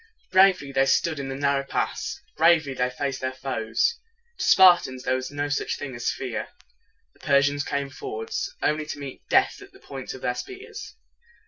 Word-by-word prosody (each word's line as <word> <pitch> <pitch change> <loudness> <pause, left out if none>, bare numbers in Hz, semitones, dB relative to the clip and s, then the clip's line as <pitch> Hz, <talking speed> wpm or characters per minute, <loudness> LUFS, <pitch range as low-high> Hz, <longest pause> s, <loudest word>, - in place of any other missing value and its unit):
Bravely 185 -7 +5
they 135 0 +2
stood 155 +2 +2
in 135 -1 -4
the 135 - -4
narrow 140 0 +1
pass. 135 - -3
Bravely 160 -3 +4
they 125 -1 0
faced 135 +1 -3
their 130 0 -1
foes. 130 - -1 0.4
To - - -1
Spartans 175 -9 +5
there 130 - +1
was 130 0 -2
no 145 0 -2
such 145 - -1
thing 135 -3 -6
as 120 -1 -2
fear. 125 -4 -4 0.7
The - - -27
Persians 145 0 +2
came 140 -1 -3
forward, 110 -3 -6 0.3
only 150 0 0
to 150 - -5
meet 140 -2 -8
death - - +3
at 395 -1 -14
the 390 - -17
points - - -7
of - - -12
their - - +1
spears. 415 +2 -8
140 Hz, 185 wpm, -25 LUFS, 130-160 Hz, 0.7 s, Bravely